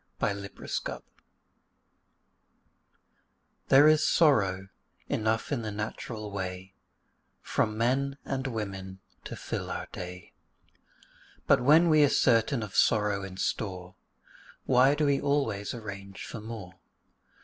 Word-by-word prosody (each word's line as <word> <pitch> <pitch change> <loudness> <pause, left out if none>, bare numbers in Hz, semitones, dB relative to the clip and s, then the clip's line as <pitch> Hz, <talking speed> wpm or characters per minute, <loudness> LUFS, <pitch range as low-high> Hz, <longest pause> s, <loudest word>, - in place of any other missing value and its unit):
THE - - 0
POWER 100 0 -7
OF 100 - -12 0.2
THE - - +2
DOG - - -6 2.6
There 140 +3 +7
is 155 0 +5
sorrow 95 - +3 0.4
enough 110 +3 -1
in 135 -5 0
the 110 -1 -4
natural 105 0 -5
way 95 -1 -5 0.7
From 105 0 -1
men 135 +4 0
and 135 0 -3
women 95 -5 -5 0.2
to - - -6
fill - - -5
our - - -4
day; 90 0 -8 1.1
But - - +4
when 155 +7 +6
we 155 -2 +5
are 145 - +5
certain 115 -1 +2
of 105 -2 -8
sorrow 105 -2 +2
in 95 -1 -8
store, 90 -2 -3 0.7
Why 130 +2 +4
do 150 0 +1
we 140 -1 +2
always 135 -9 0
arrange 100 -4 -8
for 110 - -7
more? 105 -5 -9
110 Hz, 125 wpm, -28 LUFS, 100-135 Hz, 2.6 s, There